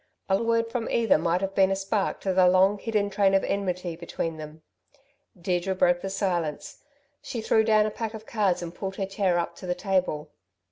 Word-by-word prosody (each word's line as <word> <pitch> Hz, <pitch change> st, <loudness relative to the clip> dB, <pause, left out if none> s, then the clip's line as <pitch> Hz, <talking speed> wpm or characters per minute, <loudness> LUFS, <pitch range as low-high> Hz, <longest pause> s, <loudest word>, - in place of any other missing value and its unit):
A 190 Hz, +2 st, +2 dB
word 230 Hz, 0 st, +1 dB
from 240 Hz, -2 st, -2 dB
either 225 Hz, -8 st, +3 dB
might 170 Hz, +2 st, 0 dB
have 195 Hz, 0 st, -2 dB
been 190 Hz, -1 st, +4 dB
a 195 Hz, -, +1 dB
spark 195 Hz, +1 st, -2 dB
to 190 Hz, -, -1 dB
the 185 Hz, 0 st, +5 dB
long 190 Hz, +3 st, +4 dB
hidden 210 Hz, -2 st, -1 dB
train 195 Hz, -1 st, +3 dB
of 195 Hz, -, +3 dB
enmity 180 Hz, -3 st, -2 dB
between 165 Hz, -1 st, -4 dB
them. 155 Hz, +1 st, -10 dB, 0.8 s
Deirdre 180 Hz, +2 st, -1 dB
broke 175 Hz, -1 st, +2 dB
the 195 Hz, -, -4 dB
silence. 175 Hz, -6 st, -2 dB, 0.4 s
She 240 Hz, -, -5 dB
threw 220 Hz, 0 st, +3 dB
down 215 Hz, -1 st, +4 dB
a 215 Hz, -, -2 dB
pack 225 Hz, +1 st, -5 dB
of 220 Hz, 0 st, -9 dB
cards 200 Hz, -7 st, 0 dB
and 170 Hz, 0 st, -6 dB
pulled 190 Hz, +1 st, -5 dB
her 195 Hz, -, -2 dB
chair 190 Hz, -2 st, 0 dB
up 170 Hz, -, -2 dB
to 185 Hz, -, -9 dB
the 180 Hz, -, 0 dB
table. 180 Hz, -5 st, -1 dB
190 Hz, 205 wpm, -26 LUFS, 175-205 Hz, 0.8 s, the